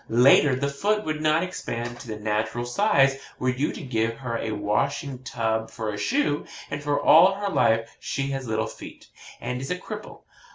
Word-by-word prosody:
Later, 130 +3 +6
the 140 +2 -1
foot 205 +10 0
would 155 -1 -2
not 155 +2 +3
expand 120 -9 -5
to 125 - -10
the 110 - -4
natural 110 +3 -1
size 135 - +3 0.2
were 130 - 0
you 135 +4 -1
to - - -8
give 115 -3 -1
her 120 -3 -4
a 110 - -3
washing 125 +6 -1
tub 110 -3 -2
for 110 -2 -4
a - - -5
shoe 230 - +1 0.3
and - - -3
for 145 0 0
all 185 +5 +7
her 200 0 -2
life 115 -10 +2
she 140 0 -3
has 135 -2 -4
little 110 0 0
feet, - - -10 0.3
and 125 0 -4
is 135 - -5
a 180 - -1
cripple. 210 +3 -9
130 Hz, 195 wpm, -25 LUFS, 115-155 Hz, 0.3 s, all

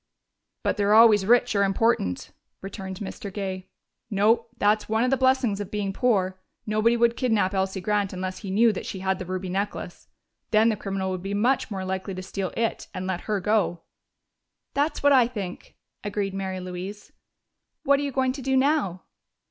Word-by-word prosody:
"But - - 0
they're 205 +1 +3
always 215 -4 +6
rich 245 -1 +4
or 200 - +4
important," 195 - 0 0.3
returned 190 -1 -6
Mr. 200 0 -6
Gay. 190 -2 -5 0.4
"No: 220 +3 +2
that's 210 0 +2
one 220 +1 +2
of 255 - +1
the - - +5
blessings 260 -5 +2
of 205 - -6
being 205 -2 -2
poor 190 -6 +1 0.3
nobody 215 +2 +2
would 235 0 +3
kidnap 220 -7 +1
Elsie 190 0 -1
Grant 205 0 0
unless 185 0 -4
he 195 - -7
knew 220 +3 +4
that - - -6
she 190 - -5
had 190 0 0
the 185 - -6
ruby 185 0 -3
necklace. 190 -1 -4 0.4
Then 220 +1 +4
the 220 - +1
criminal 195 -2 -3
would 185 -1 -4
be 195 +2 -3
much 245 +6 +1
more 190 -3 -4
likely 190 +1 -3
to 185 - -6
steal 190 0 -4
it 230 -1 -1
and 185 0 -4
let 185 +2 -4
her 210 -1 +1
go." 190 -4 0 0.9
"That's 290 +1 0
what 285 0 +6
I 250 -3 +6
think," 200 -7 -7 0.3
agreed 205 -1 -2
Mary 190 -1 -3
Louise.... 185 +3 -7 0.7
"What 280 0 +4
are - - -2
you 285 - -2
going 260 0 +1
to 270 +1 -7
do 265 +1 +1
now?" 260 - +1
205 Hz, 190 wpm, -25 LUFS, 190-230 Hz, 0.9 s, always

